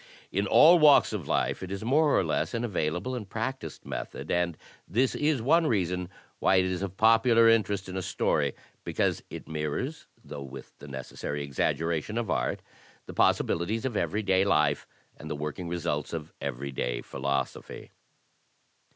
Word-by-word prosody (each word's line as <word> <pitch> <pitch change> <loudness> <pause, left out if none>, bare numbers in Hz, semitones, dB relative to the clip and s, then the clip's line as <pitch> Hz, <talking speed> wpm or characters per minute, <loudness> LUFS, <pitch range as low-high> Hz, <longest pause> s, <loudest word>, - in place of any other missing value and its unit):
In 100 +2 0
all 170 - +7
walks 150 -6 +6
of 90 -9 -4
life - - 0
it 95 0 -6
is 100 +1 -4
more 145 +4 +3
or - - +2
less - - -1
an 115 - -1
available 90 +2 -2
and 110 -6 -5
practised 130 +6 -5
method, - - -5
and 85 -2 0 0.3
this 125 +7 +1
is 150 -5 0
one 160 +5 +4
reason 90 -4 0 0.3
why - - +3
it 95 0 +4
is 95 0 -2
of 95 -1 -5
popular 115 +1 +5
interest 105 -4 +2
in 95 - -6
a 95 - -1
story, - - 0 0.3
because - - 0
it - - -8
mirrors, 80 - -3 0.2
though 75 - -7
with 70 -1 -10
the 70 - -11
necessary 70 +2 -5
exaggeration 80 - -1
of 115 -7 -1
art, - - -1 0.4
the - - -9
possibilities 100 +8 +1
of 125 -4 -2
every 100 +4 -1
day 95 -1 +3
life 75 -6 +2 0.3
and - - -9
the - - -2
working 75 +4 -5
results 80 -4 -2
of 80 -2 -6
every 70 0 -4
day - - -2
philosophy. 70 0 -4
95 Hz, 170 wpm, -28 LUFS, 75-115 Hz, 0.4 s, all